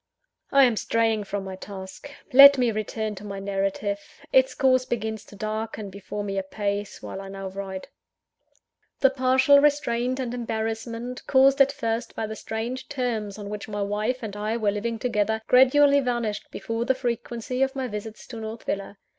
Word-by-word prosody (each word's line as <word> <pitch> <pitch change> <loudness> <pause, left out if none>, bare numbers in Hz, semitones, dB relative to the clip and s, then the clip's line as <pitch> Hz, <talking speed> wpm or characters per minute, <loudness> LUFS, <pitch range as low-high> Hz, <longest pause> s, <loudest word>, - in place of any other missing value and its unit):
I 275 0 +7
am 240 -4 +3
straying 225 -2 +1
from 200 0 -3
my 190 -1 -6
task. 190 +6 -9 0.2
Let 280 +1 +10
me 245 -2 +2
return 215 0 -3
to 195 - -10
my 200 -1 -6
narrative: 195 +1 -1 0.3
its 260 0 +4
course 255 -2 +3
begins 220 -3 -3
to - - -14
darken 215 0 -4
before 200 +1 -6
me 195 -1 -2
apace, 200 +1 -3
while 195 - -6
I 195 - -8
now 195 0 -6
write. 190 0 -6 1.1
The 270 - +5
partial 260 +2 +5
restraint 255 -3 +1
and 245 -2 -3
embarrassment, 230 +1 -4
caused 275 +1 +5
at 275 0 +6
first 230 -2 -3
by 220 - -2
the 220 0 -6
strange 235 +5 -5
terms 235 -7 -2
on 205 -1 -7
which 210 0 -6
my 205 -1 -2
wife 215 +5 -2
and 210 -2 -5
I 215 +2 -2
were 210 -3 +1
living 225 +3 -2
together, 220 -2 0
gradually 280 +3 +6
vanished 240 -5 -2
before 230 +1 -3
the 260 +2 +1
frequency 240 0 -3
of 270 +1 +1
my 265 -1 -2
visits 215 0 -7
to 235 - -7
North 220 +1 -6
Villa. 200 +1 -4
225 Hz, 175 wpm, -25 LUFS, 205-255 Hz, 1.1 s, Let